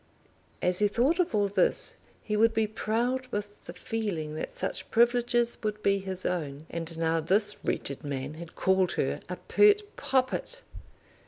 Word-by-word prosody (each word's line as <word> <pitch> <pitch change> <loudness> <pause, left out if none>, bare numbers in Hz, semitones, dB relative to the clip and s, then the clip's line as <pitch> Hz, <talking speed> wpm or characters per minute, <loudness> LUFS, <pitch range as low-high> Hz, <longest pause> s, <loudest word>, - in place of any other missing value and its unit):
As 180 0 +3
he 210 - +4
thought 255 - +1
of 345 -10 +1
all 205 -1 +2
this 200 - +1 0.3
he 210 - -2
would 225 +1 +3
be 220 - +2
proud 235 +4 -1
with 205 -3 -6
the 170 - -8
feeling 180 -6 -4
that 155 - -6
such 190 - -3
privileges 240 0 +2
would 215 -1 -3
be 200 0 +3
his 190 -1 -5
own. 155 -4 -3
And 165 -1 -3
now 165 0 +1
this 205 +6 +5
wretched 140 +2 -3
man 140 0 -4
had 165 +1 -10
called 190 -1 +2
her - - -1
a - - -3
pert 415 0 +4
poppet! 270 - -1
205 Hz, 165 wpm, -28 LUFS, 170-235 Hz, 0.3 s, this